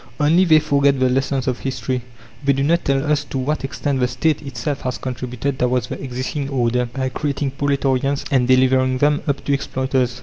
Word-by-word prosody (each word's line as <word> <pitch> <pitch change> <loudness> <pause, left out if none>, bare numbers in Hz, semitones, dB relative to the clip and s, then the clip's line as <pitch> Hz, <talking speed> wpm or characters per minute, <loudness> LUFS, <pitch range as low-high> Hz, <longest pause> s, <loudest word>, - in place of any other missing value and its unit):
Only 165 +5 +4
they 160 -3 +6
forget 140 -2 +2
the 130 -1 +3
lessons 135 0 0
of 125 -1 -1
history; 130 -1 -3 0.4
they 140 0 +3
do 135 +1 0
not 170 +4 +2
tell 135 +1 +1
us 150 -1 +1
to 135 - -5
what 140 +4 -1
extent 135 0 -2
the 125 - +2
State 150 +5 0
itself 135 0 -4
has 125 -1 -3
contributed 130 +1 -4
towards 125 -2 +1
the - - -6
existing 130 +2 -3
order 125 -2 +1
by 130 +2 -3
creating 140 +1 -2
proletarians 140 0 0
and 130 -3 +3
delivering 130 0 +3
them 145 +2 +2
up 140 -1 -1
to 140 - +1
exploiters. 130 -3 -1
135 Hz, 195 wpm, -20 LUFS, 130-140 Hz, 0.4 s, they